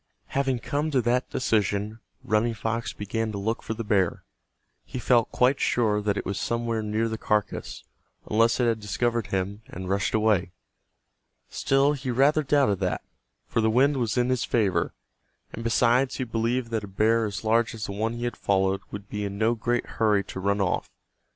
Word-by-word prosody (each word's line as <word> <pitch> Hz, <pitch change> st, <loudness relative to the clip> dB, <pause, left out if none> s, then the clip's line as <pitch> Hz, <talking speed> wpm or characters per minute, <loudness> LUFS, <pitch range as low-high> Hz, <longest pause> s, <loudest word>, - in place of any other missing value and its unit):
Having 135 Hz, -2 st, 0 dB
come 150 Hz, +1 st, -1 dB
to 140 Hz, -4 st, +2 dB
that 125 Hz, +2 st, +1 dB
decision 105 Hz, -2 st, 0 dB, 0.2 s
Running 115 Hz, +2 st, +1 dB
Fox 115 Hz, +2 st, -2 dB
began 110 Hz, +2 st, -3 dB
to -, -, -3 dB
look 110 Hz, +4 st, -2 dB
for 110 Hz, -, -4 dB
the 115 Hz, -, -4 dB
bear. 100 Hz, -5 st, +1 dB, 0.6 s
He -, -, -7 dB
felt 120 Hz, -2 st, +2 dB
quite 130 Hz, +2 st, +3 dB
sure 105 Hz, -3 st, +2 dB
that 105 Hz, -1 st, 0 dB
it -, -, -3 dB
was 100 Hz, -, -2 dB
somewhere 115 Hz, -1 st, -1 dB
near 110 Hz, +2 st, 0 dB
the 110 Hz, -1 st, -4 dB
carcass, 105 Hz, -1 st, -2 dB, 0.4 s
unless 115 Hz, +3 st, +3 dB
it 125 Hz, -, +3 dB
had 115 Hz, -2 st, +1 dB
discovered 115 Hz, +1 st, -1 dB
him 95 Hz, +2 st, -2 dB
and 95 Hz, +1 st, -7 dB
rushed 100 Hz, +2 st, 0 dB
away. 105 Hz, -5 st, +2 dB, 1.0 s
Still 135 Hz, +2 st, +2 dB
he 135 Hz, -2 st, -5 dB
rather 140 Hz, +5 st, +3 dB
doubted 135 Hz, -9 st, +2 dB
that, 95 Hz, -2 st, -1 dB, 0.4 s
for 115 Hz, -, 0 dB
the 110 Hz, -, +3 dB
wind 135 Hz, +5 st, +3 dB
was 120 Hz, -2 st, -1 dB
in 125 Hz, 0 st, +2 dB
his 130 Hz, -1 st, +1 dB
favor, 95 Hz, -7 st, +1 dB, 0.6 s
and 115 Hz, -, -6 dB
besides 125 Hz, +3 st, +3 dB
he 130 Hz, -, -2 dB
believed 115 Hz, +1 st, -1 dB
that 110 Hz, -2 st, -1 dB
a -, -, -6 dB
bear 110 Hz, +4 st, +2 dB
as 105 Hz, 0 st, -4 dB
large 115 Hz, +1 st, +2 dB
as 110 Hz, -, -4 dB
the -, -, -5 dB
one 110 Hz, +3 st, -1 dB
he 120 Hz, 0 st, -5 dB
had 120 Hz, -, -2 dB
followed 95 Hz, 0 st, +1 dB
would 100 Hz, 0 st, -8 dB
be 105 Hz, 0 st, -4 dB
in 100 Hz, 0 st, -4 dB
no 110 Hz, +2 st, +2 dB
great 120 Hz, +1 st, -1 dB
hurry 105 Hz, -3 st, +1 dB
to 95 Hz, -, -7 dB
run 100 Hz, +2 st, 0 dB
off. 90 Hz, -, 0 dB
115 Hz, 190 wpm, -26 LUFS, 105-120 Hz, 1.0 s, quite